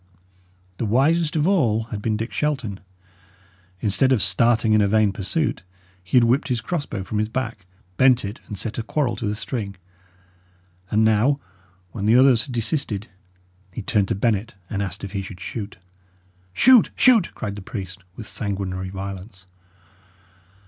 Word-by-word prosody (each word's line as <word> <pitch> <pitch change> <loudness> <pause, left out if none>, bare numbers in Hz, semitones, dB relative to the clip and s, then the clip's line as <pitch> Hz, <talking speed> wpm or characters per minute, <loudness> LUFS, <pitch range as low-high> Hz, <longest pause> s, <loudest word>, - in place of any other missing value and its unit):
The - - 0
wisest 150 +8 +2
of 155 +1 +2
all 120 - +2
had 105 -2 -4
been 110 0 0
Dick 115 +2 -5
Shelton. 130 -10 -2 1.0
Instead 115 +5 +2
of 130 - +4
starting 115 -2 +3
in 110 - +5
a 100 - +3
vain 110 0 +3
pursuit, 115 - -2 0.4
he 90 +7 +1
had 120 - +7
whipped 125 +5 +2
his 125 -3 0
crossbow 145 - -3
from 105 +2 -3
his 110 0 0
back, 115 -6 -4 0.3
bent 130 -3 +4
it, 100 +3 -6
and 105 - -6
set 115 +4 -2
a - - 0
quarrel 120 +2 -1
to 110 - -3
the 105 - -1
string; 105 -3 -4 1.1
and 110 +1 +3
now, 115 +6 +3 0.5
when 105 -2 -3
the 110 - +5
others 130 -2 +5
had - - -7
desisted, 115 -3 -2 0.6
he 100 - -6
turned 100 -1 +1
to - - -1
Bennet 110 +1 0 0.2
and 100 - -1
asked 100 0 -5
if 100 - -5
he 100 -1 -2
should 95 -1 -9
shoot. 105 +1 -6 0.7
"Shoot! 245 - +6
shoot!" 235 -8 +5
cried 105 -2 -4
the 100 - -8
priest, 95 -2 -7 0.2
with 110 - -8
sanguinary 95 -3 -3
violence. 95 +1 -7
110 Hz, 165 wpm, -23 LUFS, 100-130 Hz, 1.1 s, had